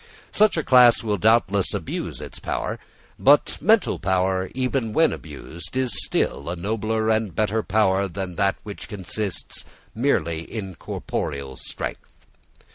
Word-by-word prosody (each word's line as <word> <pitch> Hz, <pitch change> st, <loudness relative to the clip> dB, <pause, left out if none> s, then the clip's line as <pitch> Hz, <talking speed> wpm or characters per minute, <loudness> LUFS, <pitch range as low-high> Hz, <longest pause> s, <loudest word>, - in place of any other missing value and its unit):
Such 215 Hz, -3 st, +3 dB
a 160 Hz, -, 0 dB
class 125 Hz, -3 st, +6 dB
will 105 Hz, -2 st, 0 dB
doubtless 105 Hz, -2 st, +3 dB
abuse -, -, -4 dB
its -, -, -8 dB
power: -, -, -3 dB, 0.4 s
but 145 Hz, +2 st, +4 dB
mental 215 Hz, +3 st, +3 dB
power, 95 Hz, 0 st, 0 dB
even 130 Hz, -3 st, -1 dB
when 160 Hz, +5 st, +4 dB
abused, 85 Hz, -, -7 dB
is 130 Hz, -2 st, +1 dB, 0.2 s
still 70 Hz, +2 st, -1 dB
a 90 Hz, -, -2 dB
nobler 110 Hz, +4 st, -1 dB
and 110 Hz, -6 st, 0 dB
better 110 Hz, +1 st, +1 dB
power 100 Hz, -2 st, +2 dB
than 95 Hz, 0 st, -5 dB
that 100 Hz, 0 st, +2 dB
which 105 Hz, -1 st, -8 dB
consists 100 Hz, -1 st, -3 dB, 0.3 s
merely 85 Hz, -, 0 dB
in 95 Hz, +1 st, -6 dB
corporeal 70 Hz, -5 st, -4 dB
strength. -, -, -7 dB
105 Hz, 135 wpm, -23 LUFS, 95-115 Hz, 0.4 s, class